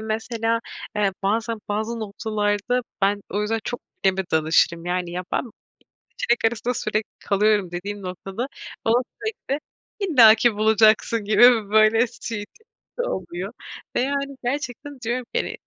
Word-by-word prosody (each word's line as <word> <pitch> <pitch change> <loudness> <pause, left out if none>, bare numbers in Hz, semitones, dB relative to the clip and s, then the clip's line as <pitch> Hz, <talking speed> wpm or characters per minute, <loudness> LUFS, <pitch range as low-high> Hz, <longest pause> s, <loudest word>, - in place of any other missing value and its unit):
mesela, 225 +1 -1 0.4
eee, 200 -2 +2
bazen 225 +3 0
bazı 220 +3 -2
noktalarda 210 +2 -1 0.2
ben 200 +1 +2
o 205 - -1
yüzden 220 +1 -1
çok 245 - -4 0.2
anneme 190 0 +2
danışırım. 160 +1 +3
Yani, 180 0 -2
ya, 180 +1 -4
ben - - +2
2 235 - -11 0.7
seçenek 240 -1 +1
arasında 235 +2 -3
sürekli 215 0 -2
kalıyorum 205 -2 +2
dediğim 200 +4 -5
noktada 195 +7 -5 0.4
bana 235 +3 +3 0.2
sürekli 305 -10 -3 0.4
"illaki 240 - +6
bulacaksın" 220 +1 +4
gibi 225 0 +5
böyle 220 +2 +5
şeyi, 225 -3 -6
tepkisi 440 - -29 0.3
oluyor. 185 +2 -4 0.4
Ve, - - +3
yani, 275 +1 -1
gerçekten 275 +1 -4
diyorum 240 +1 -2
ki - - +3
hani, - - -4
220 Hz, 140 wpm, -23 LUFS, 200-240 Hz, 0.7 s, illaki